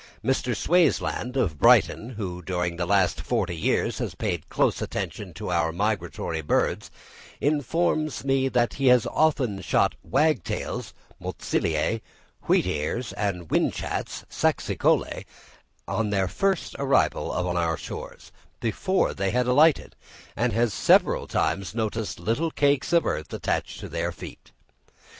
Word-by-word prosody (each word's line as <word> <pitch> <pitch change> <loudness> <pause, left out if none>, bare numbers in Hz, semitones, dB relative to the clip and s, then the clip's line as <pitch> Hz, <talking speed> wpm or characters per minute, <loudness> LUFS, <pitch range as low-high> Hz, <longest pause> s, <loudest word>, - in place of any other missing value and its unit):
Mr. 125 -2 +1
Swaysland, 160 -6 +1
of 80 - 0
Brighton, 115 - +4
who 90 -4 -5
during 90 -1 -2
the 85 0 -2
last 95 -2 +2
forty 85 - -1
years 80 - 0
has - - -3
paid - - -3
close - - +1
attention - - -4
to - - -5
our 85 -2 +1
migratory 90 -3 -2
birds, 75 - 0 0.5
informs 155 +1 0
me 135 -1 +2
that 120 -2 +1
he 135 -1 0
has 125 -2 +6
often 130 -11 +1
shot 85 - +2
wagtails 150 - -1 0.3
(Motacillæ), 80 +8 -1 0.5
wheatears, 90 +11 0
and 95 -5 -2
whinchats - - -1
(Saxicolæ), - - 0 0.6
on 110 -2 -1
their 95 -2 +1
first 195 - -1
arrival 140 0 +2
on 90 0 -1
our 85 -2 0
shores, - - -8 0.3
before 185 - 0
they 100 0 -1
had 125 +4 +1
alighted; 145 +5 +3 0.4
and 120 +2 0
he - - -2
has 115 -3 +2
several - - +3
times 95 0 -1
noticed 110 -3 -2
little 115 - 0
cakes 145 -1 +1
of 170 -1 +4
earth 75 -2 -2
attached - - -2
to - - -7
their 85 +1 -2
feet. 85 - -11
110 Hz, 135 wpm, -25 LUFS, 90-135 Hz, 0.6 s, has